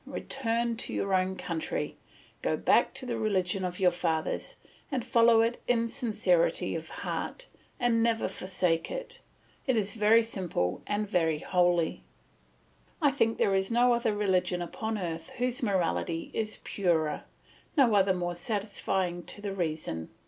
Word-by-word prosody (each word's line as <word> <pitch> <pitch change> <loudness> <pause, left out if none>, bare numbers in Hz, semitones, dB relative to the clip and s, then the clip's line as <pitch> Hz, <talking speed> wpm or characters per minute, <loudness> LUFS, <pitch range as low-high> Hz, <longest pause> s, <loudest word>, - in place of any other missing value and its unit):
Return 235 -2 -1
to - - -4
your 195 -1 -1
own 185 0 +2
country, 170 -3 -3 0.5
go - - 0
back - - +3
to 260 - -3
the 235 -2 -2
religion 195 -3 0
of 180 -1 -3
your 180 -2 +5
fathers, 165 -2 -2 0.4
and 255 -4 -1
follow 230 -2 +5
it 230 +1 0
in 230 -1 +2
sincerity 255 - +1
of - - -5
heart, - - -4 0.3
and 240 -2 +3
never 230 -1 +2
forsake 180 -3 -1
it; - - -5 0.5
it 260 -3 +3
is 205 -2 0
very 225 +1 +5
simple 175 - -2
and 210 0 -1
very 165 -6 +1
holy; 175 0 +1 1.0
I 290 -4 +4
think 230 -5 +1
there 195 - +2
is 190 0 +1
no 240 +1 +4
other 235 -3 +1
religion 185 -3 +1
upon 220 +6 -3
earth 165 -4 -4
whose 250 +2 -1
morality 175 -5 0
is 220 -1 -2
purer, 165 -6 0 0.5
no 255 -6 +5
other 195 -2 +4
more 175 -1 -2
satisfying 190 -2 -2
to - - -5
the 205 -1 -4
reason. 155 - -3
205 Hz, 150 wpm, -29 LUFS, 175-230 Hz, 1.0 s, your